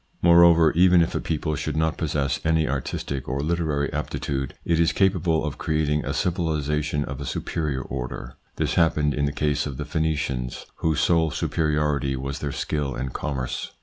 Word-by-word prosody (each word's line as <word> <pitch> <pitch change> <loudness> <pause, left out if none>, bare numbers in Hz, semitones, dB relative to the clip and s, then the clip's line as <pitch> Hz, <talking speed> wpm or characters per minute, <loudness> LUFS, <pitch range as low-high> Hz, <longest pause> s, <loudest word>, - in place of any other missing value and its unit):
Moreover, 85 -2 +7
even 90 0 +5
if 80 - -3
a - - 0
people 75 -1 -2
should 75 +1 -3
not 80 0 +1
possess 75 -3 -1
any 80 -1 +2
artistic 70 -2 -3
or 65 +1 -1
literary 75 -2 -1
aptitude, 70 -2 -3
it 85 -1 +2
is 85 0 +3
capable 90 -5 +2
of 75 - -5
creating 75 -1 0
a 70 - -2
civilisation 75 -3 0
of 65 -1 -6
a - - -3
superior 75 -6 -2
order. 60 -2 -6 0.2
This - - -1
happened 75 -3 +2
in 70 0 0
the 70 - 0
case 75 0 0
of 70 -3 -6
the - - -4
Phenicians, 70 -6 -2
whose 80 -2 +1
sole 85 -2 +3
superiority 75 -3 0
was 70 +1 -4
their 70 - -3
skill 70 -2 -2
in 65 +2 -3
commerce. 65 -1 -4
75 Hz, 175 wpm, -24 LUFS, 70-80 Hz, 0.2 s, Moreover